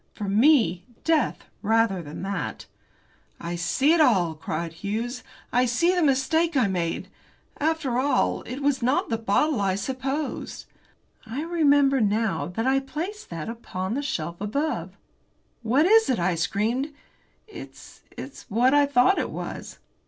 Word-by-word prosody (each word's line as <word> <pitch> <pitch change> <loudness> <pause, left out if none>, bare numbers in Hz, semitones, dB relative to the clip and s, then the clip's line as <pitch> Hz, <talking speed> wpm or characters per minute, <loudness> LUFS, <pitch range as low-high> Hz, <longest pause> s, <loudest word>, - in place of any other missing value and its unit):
For 205 - -5
me, 220 - +4 0.2
death 320 -5 +1 0.2
rather 220 -3 +2
than 150 +2 -8
that. 195 +1 -4 0.7
"I 170 +1 -4
see 260 - +2
it 335 - +4
all," 185 - +3
cried 160 +1 -4
Hughes, 225 +8 -4 0.3
"I 250 +1 +3
see 335 +10 +2
the 360 - +1
mistake 305 +3 +2
I 245 -5 +3
made. 175 -3 -2 0.5
After 300 -5 0
all, 280 +2 +1
it 255 +4 -5
was 280 -2 +1
not 255 +4 +1
the 225 -1 -1
bottle 225 +4 +1
I 190 -1 +1
supposed. 265 +7 -4 0.6
I 255 +7 -4
remember 285 -5 +3
now 205 -8 0
that 225 +6 -3
I 265 +1 +3
placed 335 +10 -6
that 165 -3 -5
upon 220 -4 -4
the 275 - -1
shelf 170 - -4
above." 280 +10 -2 0.6
"What 250 +7 +3
is 445 +4 +5
it?" 255 - +2
I 175 0 +1
screamed. 215 - -1 0.6
"It's 435 - -12 0.2
it's 270 - -9
what 245 +6 +3
I 290 -1 +5
thought 280 +7 +4
it - - -2
was." - - -7
245 Hz, 150 wpm, -25 LUFS, 195-285 Hz, 0.7 s, is